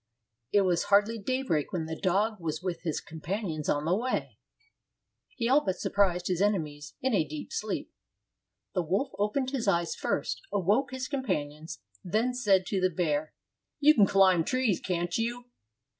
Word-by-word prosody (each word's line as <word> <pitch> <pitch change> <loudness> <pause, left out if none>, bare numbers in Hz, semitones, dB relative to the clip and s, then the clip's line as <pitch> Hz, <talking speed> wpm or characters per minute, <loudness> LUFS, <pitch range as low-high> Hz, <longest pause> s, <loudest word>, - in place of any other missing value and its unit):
It 205 - +5
was 180 -3 +1
hardly 210 +3 +3
daybreak 210 - -1
when 175 -5 -2
the 160 0 -4
dog 205 +5 +1
was 160 0 -4
with 175 -3 -3
his 165 -3 -2
companions 160 0 -4
on 145 +1 +1
the 175 +3 +2
way. 250 +5 -2 1.0
He 230 -2 -1
all 275 +4 +4
but 190 -2 -1
surprised 180 -3 +1
his 180 -1 0
ene 205 +1 +4
mies 145 -2 -8
in 260 -2 +1
a 195 - +3
deep 155 0 -7
sleep. 215 - -3 0.8
The 185 - +1
wolf 190 - -1
opened 255 +6 0
his 255 -6 -2
eyes 170 -3 +2
first, - - -2
awoke 205 +8 +2
his 255 0 -4
companions, 160 - -3 0.2
and 225 +7 0
said 200 -7 +3
to 190 0 -1
the 185 - +3
bear, 155 -3 -1 0.4
"You 300 +1 +7
can 210 -8 +5
climb 185 -3 +5
trees, 255 -2 +1
can't 175 -1 -2
you? 240 +2 -3
190 Hz, 170 wpm, -29 LUFS, 165-230 Hz, 1.0 s, You